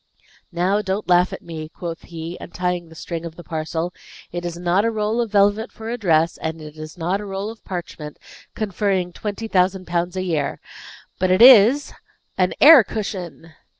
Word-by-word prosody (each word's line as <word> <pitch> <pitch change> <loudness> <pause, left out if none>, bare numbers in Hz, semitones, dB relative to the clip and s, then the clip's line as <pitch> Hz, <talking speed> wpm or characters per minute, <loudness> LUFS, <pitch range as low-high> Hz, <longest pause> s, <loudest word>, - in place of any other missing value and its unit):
"Now, 185 +4 +1
don't 195 +1 -3
laugh 180 0 +4
at - - -8
me," 155 -2 -7
quoth 165 -1 -7
he, 165 0 -7
untying 180 -2 -3
the 160 - -14
string 165 +1 -6
of 165 -1 -7
the 175 - -11
parcel. 165 +1 -3 0.4
"It 175 0 -5
is 170 -1 -4
not 180 +3 +1
a 230 - +2
roll 220 +1 -1
of 230 -3 -3
velvet 205 +2 +2
for 225 0 -7
a 240 - -3
dress, 165 -4 +2
and 160 0 -4
it 150 -1 -10
is 155 +2 -9
not 180 +4 -1
a - - -7
roll 195 +2 -4
of 225 - -15
parchment, 165 -5 -7 0.4
conferring 195 -4 -1
twenty 210 +3 -5
thousand 185 -1 +1
pounds 175 +1 -2
a 185 - -1
year. 160 -6 -2 0.6
But 185 0 +1
it 185 +5 +5
is 250 +3 +7 0.4
an 185 -1 +1
air 295 -4 +9
cushion!" 185 -6 -6
180 Hz, 185 wpm, -21 LUFS, 170-205 Hz, 0.6 s, air